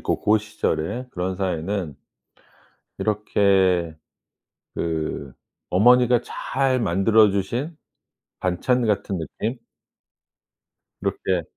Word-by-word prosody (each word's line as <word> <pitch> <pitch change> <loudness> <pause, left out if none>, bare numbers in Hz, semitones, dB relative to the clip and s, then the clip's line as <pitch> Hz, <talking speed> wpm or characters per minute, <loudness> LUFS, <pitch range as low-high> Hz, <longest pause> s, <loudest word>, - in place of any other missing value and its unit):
고 - - -1
고시절에 105 +1 0
그런 90 -1 -3
사회는 90 -3 -2 1.0
이렇게 95 -5 +2 0.8
그 80 -4 -3 0.4
어머니가 125 +5 +5
잘 130 -1 -1
만들어 105 +2 +4
주신 120 - -2 0.6
반찬 115 +7 0
같은 100 -2 -1
느낌? 110 - -4 1.4
이렇게 90 -2 -1
100 Hz, 170 characters per minute, -23 LUFS, 90-115 Hz, 1.4 s, 어머니가